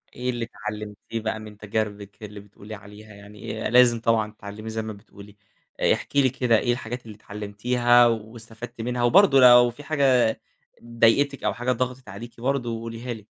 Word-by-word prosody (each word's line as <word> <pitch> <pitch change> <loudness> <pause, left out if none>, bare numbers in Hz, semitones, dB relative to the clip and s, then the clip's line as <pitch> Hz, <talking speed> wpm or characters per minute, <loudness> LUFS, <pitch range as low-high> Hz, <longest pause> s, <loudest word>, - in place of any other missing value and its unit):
إيه 125 +1 -3
اللي 120 -2 -2
اتعلّمتيه 105 0 -7
بقى 110 0 -3
من 105 -1 -11
تجاربِك 105 -1 -5
اللي 105 0 -9
بتقولي 105 +1 -12
عليها؟ 105 +1 -14
يعني 105 +2 -8
آآ - - 0
لازم 120 0 +5
طبعًا 110 -2 +1
تتتعلّمي 105 +1 -9
زي 110 0 -3
ما 110 -1 -6
بتقولي، 100 0 -15 0.6
احكي 140 - 0
لي 130 - +3
كده، 120 -3 +1
إيه 120 - 0
الحاجات 120 0 -5
اللي 110 -2 -10
اتعلّمتيها 120 +4 +2
واستفدتِ 115 +1 -6
منها 120 +1 -2
وبرضه 140 +2 +5
لو 120 -1 +8
في 120 +5 -12
حاجة 135 -7 +2 0.4
ضايقتِك 120 +4 +2
أو - - 0
حاجة 120 +1 -2
ضغطِت 125 -1 -3
عليكِ 115 +4 -10
برضه 135 -2 -1
قوليها 115 +1 -6
لي. 110 -2 -12
115 Hz, 170 wpm, -24 LUFS, 105-120 Hz, 0.6 s, لو